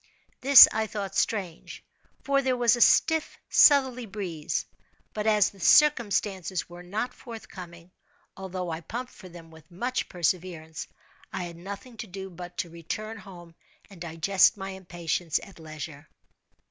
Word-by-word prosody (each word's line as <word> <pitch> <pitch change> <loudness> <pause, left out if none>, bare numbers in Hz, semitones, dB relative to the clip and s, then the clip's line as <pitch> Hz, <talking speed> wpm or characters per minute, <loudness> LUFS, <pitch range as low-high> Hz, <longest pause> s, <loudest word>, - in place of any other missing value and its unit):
This 275 0 +10
I 220 0 -1
thought 200 -2 -5
strange, 185 -7 -3 0.4
for 275 0 +2
there 260 -2 0
was 240 -1 +4
a 240 - -4
stiff 320 +5 +3
southerly 260 -5 +5
breeze; 185 -7 -4 0.5
but 215 0 -3
as 210 -2 +3
"the 195 - -19
circumstances" 200 - +2
were 175 0 -11
not 215 +8 -4
forthcoming, 180 -7 -11 0.4
although 185 -2 -5
I 160 +1 -5
pumped 245 +9 -6
for 185 - -13
them 165 -1 -13
with 160 -1 -17
much 245 +9 -3
perseverance, 170 -2 -3 0.4
I 185 - -4
had 170 -1 -7
nothing 200 +7 -9
to 220 - -7
do 190 0 -8
but 175 0 -10
to 170 - -3
return 215 +7 -6
home 175 -4 -13 0.4
and 180 -4 -14
digest 170 +4 +2
my 195 0 -6
impatience 175 -3 -3
at 195 - -14
leisure. 155 -1 -9
190 Hz, 145 wpm, -27 LUFS, 170-220 Hz, 0.5 s, This